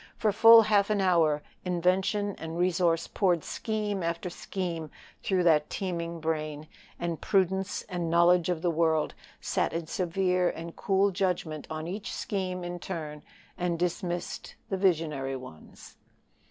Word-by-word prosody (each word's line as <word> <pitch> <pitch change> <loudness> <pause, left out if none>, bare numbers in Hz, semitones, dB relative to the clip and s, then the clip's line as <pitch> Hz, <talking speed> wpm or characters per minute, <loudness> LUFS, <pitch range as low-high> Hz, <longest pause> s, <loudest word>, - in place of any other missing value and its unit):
For 215 - +2
full 225 +2 +8
half 205 -1 +3
an 210 -1 +1
hour 165 -6 +3 0.2
invention 185 +3 +1
and 160 +1 -5
resource 175 -2 +2
poured 180 -5 +1
scheme 210 -3 -3
after 170 +1 -3
scheme 170 -4 -4 0.3
through 185 -2 +1
that 155 -3 +4
teeming 170 -3 -3
brain, 155 -1 -3 0.3
and 170 -2 -3
prudence 190 0 +1
and 175 -2 -3
knowledge 170 +1 +4
of 175 -2 -1
the 175 - +2
world 160 -1 +1 0.3
sat - - 0
in 165 0 -2
severe 180 +1 +1
and 165 +1 -7
cool 195 0 +2
judgment 180 -5 -2
on 155 0 -4
each 200 +4 -5 0.2
in 180 -2 -2
turn, 155 -5 -6 0.4
and 175 -1 0
dismissed 175 0 -3
the 195 - -1
visionary 155 -8 0
ones. 125 -12 -12
175 Hz, 140 wpm, -28 LUFS, 165-190 Hz, 0.4 s, full